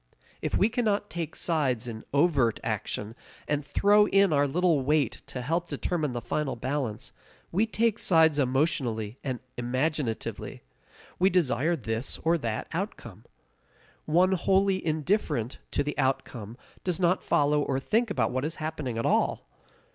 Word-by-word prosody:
If -, -, 0 dB
we 200 Hz, -, +4 dB
cannot 215 Hz, -4 st, 0 dB
take 165 Hz, -3 st, -4 dB
sides 135 Hz, -9 st, 0 dB
in 110 Hz, -2 st, -6 dB
overt 140 Hz, -6 st, +2 dB
action, 105 Hz, +2 st, -3 dB, 0.3 s
and 145 Hz, 0 st, 0 dB
throw 205 Hz, +8 st, +4 dB
in 195 Hz, -4 st, +4 dB
our 145 Hz, 0 st, +3 dB
little 165 Hz, 0 st, +2 dB
weight 145 Hz, -2 st, +1 dB
to 125 Hz, -, -5 dB
help 170 Hz, +5 st, -1 dB
determine 155 Hz, -7 st, -2 dB
the 120 Hz, -, -3 dB
final 135 Hz, +4 st, -2 dB
balance, 130 Hz, -3 st, -3 dB, 0.4 s
we 205 Hz, +6 st, +2 dB
take 225 Hz, 0 st, +1 dB
sides 160 Hz, -4 st, +4 dB
emotionally 130 Hz, -5 st, 0 dB
and 130 Hz, -3 st, -3 dB, 0.2 s
imaginatively. 130 Hz, 0 st, -2 dB, 0.6 s
We 185 Hz, +2 st, +5 dB
desire 165 Hz, -3 st, +2 dB
this 115 Hz, -3 st, -3 dB
or 165 Hz, +1 st, +2 dB
that 115 Hz, -5 st, -3 dB
outcome. -, -, -5 dB, 0.8 s
One 175 Hz, +4 st, +3 dB
wholly 190 Hz, +1 st, +2 dB
indifferent 155 Hz, -, -1 dB
to -, -, 0 dB
the 150 Hz, +1 st, -3 dB
outcome 120 Hz, -4 st, -2 dB, 0.3 s
does 180 Hz, -1 st, -1 dB
not 180 Hz, 0 st, +2 dB
follow 145 Hz, 0 st, +2 dB
or 135 Hz, -2 st, 0 dB
think 225 Hz, -, +1 dB
about 200 Hz, -, 0 dB
what 130 Hz, +1 st, -1 dB
is 155 Hz, +2 st, -3 dB
happening 155 Hz, -6 st, -4 dB
at 115 Hz, -, -1 dB
all. -, -, +1 dB
150 Hz, 145 wpm, -28 LUFS, 130-175 Hz, 0.8 s, We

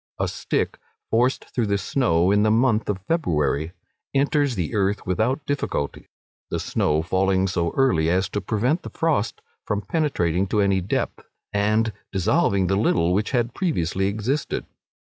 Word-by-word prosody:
A -, -, 0 dB
stick -, -, -2 dB, 0.3 s
forced 125 Hz, +3 st, +1 dB
through 120 Hz, -4 st, 0 dB
the 100 Hz, 0 st, +1 dB
snow 90 Hz, -4 st, +2 dB
in 105 Hz, 0 st, +4 dB
the 110 Hz, -, +3 dB
month 115 Hz, -1 st, +2 dB
of 95 Hz, -2 st, -3 dB
February 80 Hz, -, 0 dB, 0.4 s
enters 140 Hz, -1 st, +2 dB
the 90 Hz, -5 st, -2 dB
earth 100 Hz, -1 st, 0 dB
without 115 Hz, -, 0 dB
difficulty, 145 Hz, -, -3 dB, 0.4 s
the -, -, -2 dB
snow 75 Hz, +1 st, 0 dB
falling 95 Hz, +2 st, +1 dB
so 85 Hz, -2 st, 0 dB
early 105 Hz, -13 st, +3 dB
as 90 Hz, +2 st, +2 dB
to 105 Hz, -, -2 dB
prevent 120 Hz, -, 0 dB
the -, -, -8 dB
frost 150 Hz, -9 st, -1 dB, 0.2 s
from 105 Hz, 0 st, -2 dB
penetrating 100 Hz, -, 0 dB
to 105 Hz, -, 0 dB
any 100 Hz, -1 st, +2 dB
depth, 90 Hz, -, -2 dB, 0.3 s
and 110 Hz, +2 st, +1 dB, 0.2 s
dissolving 100 Hz, -, +2 dB
the 95 Hz, +2 st, +1 dB
little 90 Hz, -4 st, +2 dB
which 105 Hz, +3 st, 0 dB
had 120 Hz, -2 st, 0 dB
previously 95 Hz, -, 0 dB
existed. 110 Hz, +8 st, -2 dB
100 Hz, 155 wpm, -23 LUFS, 95-125 Hz, 0.4 s, in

